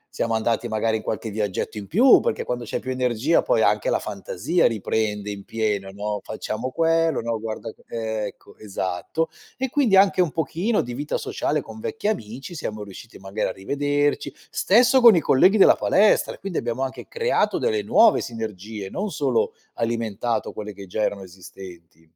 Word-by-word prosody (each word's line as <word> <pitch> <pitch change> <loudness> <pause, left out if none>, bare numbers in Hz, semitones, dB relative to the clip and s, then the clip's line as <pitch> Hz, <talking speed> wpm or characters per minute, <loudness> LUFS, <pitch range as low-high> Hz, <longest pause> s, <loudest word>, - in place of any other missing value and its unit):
siamo 115 - -1
andati 115 +1 0
magari 110 0 0
in 110 - -3
qualche 110 +1 -3
viaggetto 105 0 -3
in 100 -2 -6
più, 245 +8 +6
perché - - -2
quando 120 -1 -3
c'è 120 - -3
più 130 - -7
energia 125 +4 +1
poi - - +2
anche - - +2
la - - +1
fantasia 430 - -1
riprende 105 -1 -1
in 100 -1 -6
pieno, 105 -3 -2
no: 105 +1 -4
"Facciamo 110 +3 -4
quello, 165 -1 +2
no 115 0 -2
guarda 110 0 -6
co" - - -25
ecco, 110 -2 -5
esatto. 95 - -3 0.3
E 265 0 -2
quindi 240 -7 +3
anche 190 -1 +5
un 165 -5 +1
pochino 170 - -1
di 120 0 -6
vita 145 +4 -3
sociale 150 +1 -1
con 110 -4 -10
vecchi 210 - -3
amici, 135 - -4
siamo 110 -8 -5
riusciti 100 +3 -11
magari 95 +2 -3
a - - -3
rivederci. 145 +7 -1 0.2
Stesso 250 +5 +4
con 230 -7 +8
i - - +5
colleghi 185 +8 +4
della - - +7
palestra, 210 +1 +3
quindi 195 -4 -3
abbiamo 120 +2 -2
anche 130 - -6
creato 470 0 +1
delle 435 -3 0
nuove 225 -2 +5
sinergie, 110 -3 -6
non 200 - -3
solo 455 - 0 0.2
alimentato 115 0 -2
quelle 105 0 -6
che 100 -1 -11
già 105 +4 -3
erano 100 -2 -1
esistenti. 90 -3 -13
115 Hz, 175 wpm, -23 LUFS, 105-165 Hz, 0.3 s, con